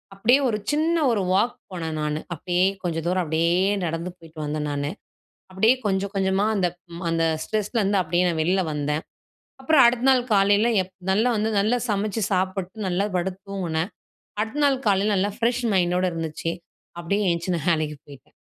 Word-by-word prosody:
அப்டியே 240 +7 +4
ஒரு 210 - 0
சின்ன 320 +3 +1
ஒரு 210 -4 +1
வாக் 215 +6 +2 0.2
போனே 165 -3 -4
நானு, 150 0 -1 0.2
அப்டியே 175 +3 0 0.2
கொஞ்ச 170 -2 -2
தூரம், 180 +1 +1
அப்டியே 170 +5 +2
நடந்து 165 +2 -3
போயிட்டு 160 -2 -14
வந்தேன் 150 0 -2
நானு. 145 0 -2 0.6
அப்டியே 220 +7 +4
கொஞ்ச, 190 -1 +1
கொஞ்சமா 190 0 +1
அந்த 185 -4 +2
ப் 170 0 -11
அந்த 165 0 +1 0.2
ஸ்ட்ரெஸ்லருந்து, 210 -2 0
அப்டியே 175 +2 +1
நான் 165 -2 -1
வெளில 185 +3 +2
வந்தேன். 150 +1 -1 0.6
அப்றம் 275 0 +5
அடுத்த 240 +1 +1
நாள் 255 -2 +4
காலையில 205 +3 +4 0.2
எப் 185 - -21 0.2
நல்லா 220 +6 +2
வந்து, 215 +1 0
நல்லா 230 +5 +2
சமச்சு 210 +1 -1
சாப்ட்டு, 190 +2 -2
நல்லா 185 +3 0
படுத்து 185 +1 -2
தூங்குனேன். 180 -2 -2 0.5
அடுத்த 225 +8 -2
நாள் 275 -2 +2
காலையில 200 +1 +2
நல்லா 195 +2 +1
ஃப்ரெஷ் 240 +1 0
மைண்டோட 180 0 +2
இருந்துச்சு. 165 0 -3 0.5
அப்டியே 200 +5 0
எந்திச்சி 170 +2 -1
நான் 165 +1 -3
வேலைக்கு 155 -2 0
போயிட்டேன். 140 -3 -15
190 Hz, 165 wpm, -24 LUFS, 165-210 Hz, 0.6 s, அப்றம்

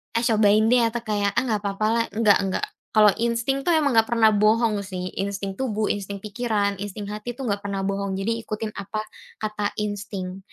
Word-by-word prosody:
"Eh, 230 - +2
cobain 215 -2 +4
deh." 245 -1 +5
Atau 235 +1 -3
kayak, 205 -1 +1
"Ah, - - -1
nggak 215 -2 -1
papa 200 +1 -1
lah." 230 0 +2
Enggak 215 -2 +5
nggak, 185 - -1 0.3
kalau 210 -1 +7
insting 235 +3 0
itu 275 - -9
emang 295 -3 +3
nggak 225 -2 +4
pernah 225 -2 +4
bohong 215 +1 +3
sih, 185 -2 -5
insting 200 0 -2
tubuh, 220 -5 0
insting 200 0 -5
pikiran, 210 -2 -1
insting 205 0 -5
hati 215 +3 -5
itu 270 - -7
nggak 205 -5 -1
pernah 200 -1 -3
bohong, 195 0 -2
jadi 225 +4 -1
ikutin 215 -1 -4
apa 210 +1 -5 0.4
kata 210 -1 -2
insting. 200 -2 -5
210 Hz, 195 wpm, -24 LUFS, 200-230 Hz, 0.4 s, kalau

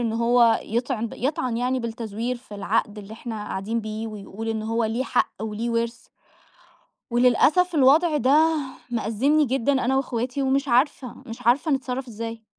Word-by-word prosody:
إن 230 -2 -1
هو 235 0 +4
يطعن 235 0 -2
يطعَن 255 -2 -1
يعني 250 +2 0
بالتزوير 230 +1 -4
في 240 -3 -13
العقد 205 +1 -1
اللي 205 +1 -10
إحنا 230 +1 -7
قاعدين 220 +5 -2
بيه، 215 +1 -5
ويقول 215 +1 -7
إن 220 -1 -2
هو 225 +1 0
ليه 225 +4 -1
حق - - +1
وليه 220 +2 -3
ورث 235 +1 -2 1.1
وللأسف 265 +9 +3
الوضع 300 +4 +4
ده 305 +4 +4 0.3
مأزَّمني 240 +7 +2
جدًا 265 +1 +1
أنا 265 -1 +1
وإخواتي، 255 +1 -2
ومش 275 +1 +1
عارفة، 255 0 +1
مش 235 +2 -9
عارفة 275 +7 +3
نتصرَّف 265 -2 -2
إزاي. 225 0 -7
235 Hz, 155 wpm, -24 LUFS, 225-265 Hz, 1.1 s, هو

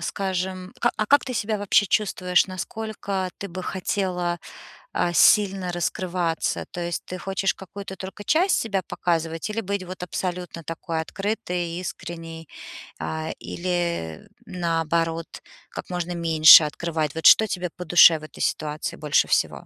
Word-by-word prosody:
скажем, 185 -1 -3
ка 240 - +3
а 215 - 0
как 285 +1 +4
ты 255 - -4
себя 215 0 -1
вообще 205 0 +3
чувствуешь, 180 -3 +2
насколько 195 0 -4
ты 200 - -6
бы 185 +1 -6
хотела, 180 -2 -2 0.6
а, 175 - +1
сильно 195 -1 +4
раскрываться? 175 -1 -1
То 175 - -6
есть 170 -1 -3
ты 185 - -7
хочешь 195 +1 -1
какую-то 195 0 -9
только 195 +2 -8
часть 360 +5 +3
себя 200 -4 -1
показывать 165 +2 -2
или 225 - -2
быть 200 -2 -3
вот 185 0 -9
абсолютно 180 -2 -4
такой 165 0 -4
открытой, 180 -3 -3
искренней, 165 -2 -7 0.5
а, 80 0 -4
или, 170 - -3 0.2
наоборот, 165 -1 -1 0.4
как - - -8
можно 175 0 -3
меньше 160 -2 +8
открывать? 155 0 -3
Вот 160 - -5
что 220 - +8
тебе 180 -3 -3
по 180 - -6
душе 165 -1 +7
в - - -16
этой 155 - -10
ситуации 150 0 -2
больше 150 -1 +2
всего? - - 0
180 Hz, 145 wpm, -24 LUFS, 165-195 Hz, 0.6 s, меньше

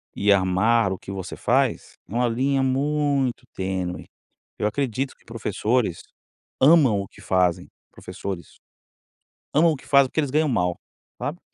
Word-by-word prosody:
e 100 0 +2
amar 100 +3 +3
o 95 - -3
que - - -9
você 95 -3 -6
faz, - - 0
é - - -11
uma 120 0 +2
linha 135 +4 +1
muito 140 -1 0
tênue. 95 -1 -3 0.5
Eu 105 - 0
acredito 130 +2 -2
que - - -30
professores 110 -3 -1 0.6
amam 135 -8 +5
o 100 - -7
que - - -18
fazem 90 -2 +1 0.2
professores 95 -3 -7 1.0
amam 160 +3 +5
o - - -3
que 130 - -14
fazem 140 -1 +5
porque - - -2
eles 140 - -2
ganham 155 +1 +2
mal, 90 -6 0 0.4
sabe? 140 +8 -4
115 Hz, 150 wpm, -24 LUFS, 95-140 Hz, 1.0 s, amam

